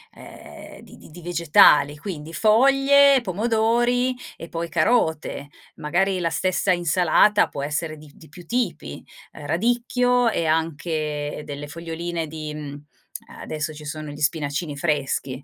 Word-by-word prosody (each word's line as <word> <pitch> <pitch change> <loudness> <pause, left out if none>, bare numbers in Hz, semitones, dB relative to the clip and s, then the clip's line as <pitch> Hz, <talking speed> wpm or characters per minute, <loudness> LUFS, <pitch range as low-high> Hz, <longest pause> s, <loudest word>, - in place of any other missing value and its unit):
ehm, - - -13
di - - -15
di - - -16
di 175 +3 -12
vegetali 165 -4 +4
quindi 165 -3 -7
foglie, 275 - +5
pomodori 235 +5 +1 0.2
e 165 - -10
poi 170 0 -4
carote, 160 - 0 0.3
magari 185 +5 0
la 170 -1 0
stessa 185 +3 0
insalata 175 +4 +3
può 140 - -6
essere 155 +2 -3
di 150 -1 -15
di 160 - -17
più 175 -2 -14
tipi, 220 - -3 0.3
ehm, 150 - -11
radicchio 245 - +1
e 170 -6 -1
anche 155 -2 -2
delle 145 0 -7
foglioline 170 0 -5
di 155 -1 -7
mhmm, 145 -2 -7 0.6
eh, - - -12
adesso 155 0 -4
ci 150 0 -11
sono 155 0 -6
gli 145 - -10
spinacini 150 0 -2
freschi, 140 -3 -2
165 Hz, 140 wpm, -23 LUFS, 150-210 Hz, 0.6 s, foglie